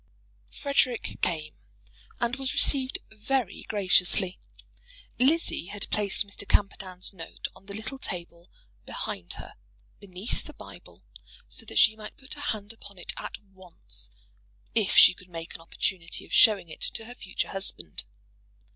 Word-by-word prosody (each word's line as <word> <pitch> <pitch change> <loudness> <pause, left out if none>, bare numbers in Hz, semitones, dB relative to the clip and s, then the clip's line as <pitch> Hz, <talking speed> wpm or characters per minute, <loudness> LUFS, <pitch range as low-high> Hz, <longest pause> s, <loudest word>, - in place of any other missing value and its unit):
"Frederic" 270 -4 0
came 155 -3 0 0.7
and 240 +2 0
was 270 0 -1
received 275 -2 +3
very 225 +2 -1
graciously. 185 -2 +4 0.8
Lizzie 280 - +3
had 205 +1 0
placed 205 -1 +1
Mr. 200 0 -7
Camperdown's 190 -2 +1
note 165 -3 -6
on 195 - -18
the 200 - -6
little 220 +5 -4
table 170 -5 -5 0.3
behind 90 0 -4
her, - - -8 0.5
beneath 195 +3 -2
the - - -9
Bible, - - -13 0.4
so - - -6
that - - -5
she 220 -7 +7
might 215 -1 -9
put 265 +1 -7
her 290 - -8
hand 215 -5 -2
upon 205 -3 -12
it 180 - -3
at - - -6 0.2
once, 185 - -9 0.6
if - - +2
she - - +11
could 180 0 -16
make 165 -1 -6
an - - -9
opportunity 165 +1 -2
of - - -12
showing 205 -5 +7
it 160 - -10
to 225 - -4
her 240 - -8
future 185 -6 -3
husband. 85 - -1
200 Hz, 145 wpm, -28 LUFS, 180-235 Hz, 0.8 s, she